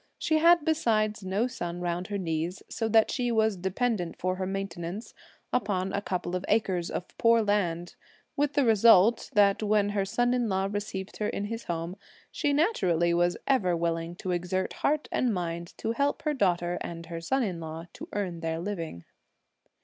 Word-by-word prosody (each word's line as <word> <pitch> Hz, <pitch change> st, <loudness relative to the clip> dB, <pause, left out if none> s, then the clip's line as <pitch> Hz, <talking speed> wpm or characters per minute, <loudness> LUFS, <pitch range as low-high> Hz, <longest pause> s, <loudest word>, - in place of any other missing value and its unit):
She 315 Hz, -1 st, +1 dB
had 340 Hz, -1 st, +5 dB
besides 215 Hz, -, +1 dB
no 195 Hz, +5 st, 0 dB
son 175 Hz, -8 st, -4 dB
round 175 Hz, +1 st, -2 dB
her 205 Hz, -, -2 dB
knees, 170 Hz, 0 st, -3 dB
so 225 Hz, -1 st, -2 dB
that 220 Hz, 0 st, +4 dB
she 245 Hz, -2 st, 0 dB
was 220 Hz, -2 st, +2 dB
dependent 190 Hz, 0 st, -1 dB
for 185 Hz, +1 st, -1 dB
her 185 Hz, 0 st, -2 dB
maintenance 195 Hz, +1 st, -5 dB, 0.4 s
on 195 Hz, -5 st, 0 dB
a 200 Hz, -, 0 dB
couple 180 Hz, -2 st, -3 dB
of 180 Hz, -, -2 dB
acres 185 Hz, -5 st, +1 dB
of 180 Hz, -, -5 dB
poor 230 Hz, -1 st, +5 dB
land, 175 Hz, -5 st, 0 dB, 0.4 s
with 290 Hz, 0 st, +1 dB
the 285 Hz, -2 st, +3 dB
result 225 Hz, -1 st, +5 dB
that 200 Hz, -2 st, +4 dB
when 210 Hz, -1 st, +2 dB
her 205 Hz, -1 st, 0 dB
son 245 Hz, +5 st, +1 dB
in 245 Hz, -3 st, 0 dB
law 190 Hz, 0 st, +1 dB
received 205 Hz, -2 st, -4 dB
her 210 Hz, -, -1 dB
in 200 Hz, -, -3 dB
his 230 Hz, +2 st, -5 dB
home, 170 Hz, +2 st, -3 dB, 0.3 s
she 290 Hz, -, 0 dB
naturally 185 Hz, -, +2 dB
was 175 Hz, +1 st, +2 dB
ever 185 Hz, -11 st, +2 dB
willing 165 Hz, 0 st, -2 dB
to 185 Hz, +1 st, -4 dB
exert 180 Hz, +1 st, -1 dB
heart 300 Hz, +1 st, +1 dB
and 240 Hz, -5 st, +1 dB
mind 170 Hz, -1 st, -4 dB
to 225 Hz, -, -2 dB
help 280 Hz, +5 st, 0 dB
her 305 Hz, -2 st, +1 dB
daughter 175 Hz, -7 st, +1 dB
and 170 Hz, -1 st, -6 dB
her 165 Hz, -1 st, -6 dB
son 265 Hz, +10 st, +1 dB
in 185 Hz, -6 st, -3 dB
law 160 Hz, 0 st, -6 dB
to -, -, -9 dB
earn 185 Hz, -5 st, -3 dB
their 165 Hz, 0 st, -2 dB
living. 165 Hz, -, -5 dB
195 Hz, 185 wpm, -28 LUFS, 175-225 Hz, 0.4 s, had